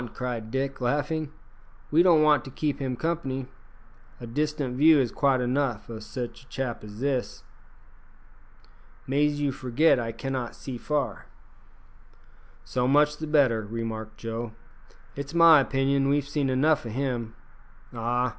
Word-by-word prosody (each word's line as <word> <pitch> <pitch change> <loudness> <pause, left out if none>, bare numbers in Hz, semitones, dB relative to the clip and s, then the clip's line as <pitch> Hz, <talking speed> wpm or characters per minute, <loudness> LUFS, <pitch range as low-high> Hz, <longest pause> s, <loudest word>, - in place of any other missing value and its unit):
cried 120 -3 -4
Dick, 135 +2 -3
laughing; 145 +4 -1 0.6
"we 160 +3 +5
don't 170 -4 +5
want 150 -1 +4
to 135 - -9
keep 145 +2 -2
him 130 -2 -2
company. 135 -4 -2 0.7
A 120 - -7
distant 145 +1 -2
view 155 +2 +6
is 125 -4 +1
quite 135 -3 +2
enough 125 -4 -1
o' 110 - -6
sich 120 +3 -6
a 130 - -21
chap 130 -4 -4
as 105 +2 -10
that." 125 -7 -2 1.6
"Mais 145 +2 +1
you 145 -1 +1
forgit 130 +3 +2
I 115 -1 -3
cannot 125 +1 -4
see 125 -3 -7
far." 150 -1 -2 1.4
"So 125 0 0
much 150 +2 +3
the 155 - -5
better," 135 -8 +3
remarked 110 0 -5
Joe; 115 0 -5 0.6
"it's 140 +3 -6
my 165 -2 +8
opinion 135 0 +1
we've 140 0 +1
seen 145 -2 -1
enough 145 +4 +2
o' 115 - -6
him. 120 -2 -3 0.6
Ah! 120 +2 0
135 Hz, 145 wpm, -26 LUFS, 120-145 Hz, 1.6 s, my